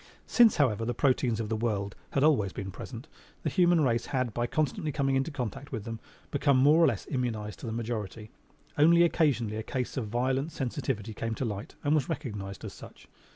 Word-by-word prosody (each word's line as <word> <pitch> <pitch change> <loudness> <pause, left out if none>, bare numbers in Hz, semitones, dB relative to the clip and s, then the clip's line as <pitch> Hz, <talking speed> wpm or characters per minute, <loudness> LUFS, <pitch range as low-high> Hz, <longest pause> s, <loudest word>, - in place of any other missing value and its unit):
Since, 235 -3 +5
however, 115 -7 +2
the 120 +1 -2
proteins 125 -3 +2
of 110 -2 -3
the 110 - 0
world 105 -3 -1 0.2
had 135 - +2
always 130 -11 +3
been 95 -1 -5
present, 120 - -8 0.4
the - - -1
human 175 -3 +4
race 120 -4 +1
had, 130 -4 -1
by 120 +2 -1
constantly 155 +2 -1
coming 135 -2 +1
into 135 +3 +1
contact 135 -1 -5
with 115 -6 -4
them, 115 0 -6 0.3
become 140 -1 +3
more 150 +6 +6
or - - +7
less 110 -7 -1
immunized 110 - -2
to - - -7
the - - -3
majority. 110 -2 -4 0.5
Only 170 +3 +7
occasionally 135 -11 +2
a - - -2
case 125 +3 -3
of 120 -5 -2
violent 130 +7 0
sensitivity 125 -6 -3
came 115 +1 -3
to 130 - -2
light 105 -1 -5
and 145 - +2
was 150 -1 +1
recognized 105 - -5
as - - -7
such. - - -13
125 Hz, 200 wpm, -29 LUFS, 110-145 Hz, 0.5 s, or